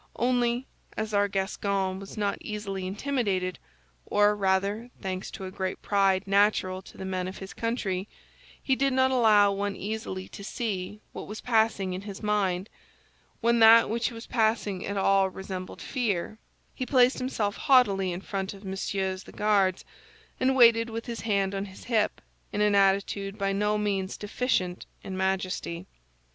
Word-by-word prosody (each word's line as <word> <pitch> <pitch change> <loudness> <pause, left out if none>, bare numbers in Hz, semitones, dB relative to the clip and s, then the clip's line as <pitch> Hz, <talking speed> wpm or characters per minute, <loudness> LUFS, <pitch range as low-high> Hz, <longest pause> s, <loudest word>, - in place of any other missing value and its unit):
Only, 245 0 +1 0.3
as 215 0 -3
our 205 0 +3
Gascon 195 -1 -1
was 195 +2 -10
not 200 -1 -1
easily 195 -3 -4
intimidated—or 190 - -1
rather, 200 +4 0
thanks 185 0 -4
to 190 - -7
a 185 - -6
great 190 -1 -3
pride 195 -1 +2
natural 195 -2 +2
to - - -15
the 190 - -6
men 185 -1 -2
of 190 - -7
his 190 0 -8
country, 210 -5 -2 0.6
he 265 - +2
did 275 0 +1
not 260 0 +3
allow 215 -5 +5
one 200 0 -2
easily 200 -2 -5
to 200 - -10
see 210 -2 -4
what - - -7
was 215 +1 -6
passing 220 -5 +1
in 185 - -4
his 200 +1 -8
mind 195 -3 0 0.7
when 235 0 +3
that 225 0 +7
which 235 +1 0
was 230 -1 -9
passing 220 -5 0
at 200 0 -3
all 195 0 +3
resembled 190 -1 -7
fear—he 220 +1 -4
placed 255 -1 +4
himself 225 -5 -1
haughtily 200 -8 +3
in 175 +1 -5
front 195 0 -4
of 195 +1 -13
Messieurs 190 0 -3
the - - -12
Guards, 200 -3 +1 0.5
and 265 +1 +2
waited 230 -2 +6
with 230 0 -5
his 235 -2 -5
hand 200 -3 0
on 195 0 -2
his 190 -1 -12
hip, 220 -3 0 0.3
in 205 - -3
an 210 0 +3
attitude 195 0 +2
by 195 -1 0
no 210 +1 +1
means 200 -2 -1
deficient 205 -4 -1 0.2
in 190 - -5
majesty. 190 -2 -2
200 Hz, 160 wpm, -27 LUFS, 190-225 Hz, 0.7 s, that